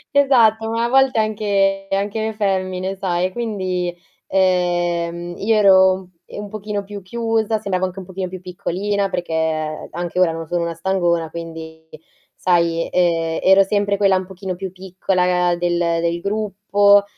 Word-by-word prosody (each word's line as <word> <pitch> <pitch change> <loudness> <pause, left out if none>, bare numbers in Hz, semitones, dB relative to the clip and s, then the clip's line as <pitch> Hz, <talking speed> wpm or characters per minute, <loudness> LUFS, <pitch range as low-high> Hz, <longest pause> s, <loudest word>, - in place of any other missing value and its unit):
Esatto, 225 -5 +4
ma 230 +1 0
a - - -1
volte 265 -3 +4
anche 200 -2 0
anche 200 +3 -1
le 220 0 -2
femmine, 190 -2 -1
sai? 185 -1 -1
Quindi, 185 -6 -2 0.3
ehm, 175 -2 0
io 220 +2 +1
ero, 190 -2 +5 0.2
ehm, - - -8
un - - -10
pochino 210 -1 -4
più 200 -1 -9
chiusa, 225 +1 -1
sembravo 190 -3 -1
anche 185 +1 -6
un 185 - -8
pochino 185 0 -5
più 185 0 -8
piccolina, 195 +3 -2
perché 160 -3 -2
anche 175 +2 -3
ora 175 -3 +4
non 165 -1 -6
sono 175 0 -1
una 170 0 -2
stangona, 170 -2 0
quindi 160 -1 -9 0.5
sai, 170 -2 +1
ehm, 165 -2 +1
ero 190 +1 +6
sempre 200 0 +1
quella 195 -1 +3
un 185 - -3
pochino 190 -1 -6
più 190 0 -6
piccola 180 -1 0
del, 175 0 0
uhm, 170 -1 +1
del 170 0 -1
gruppo, 205 0 +3
185 Hz, 155 wpm, -20 LUFS, 175-205 Hz, 0.5 s, ero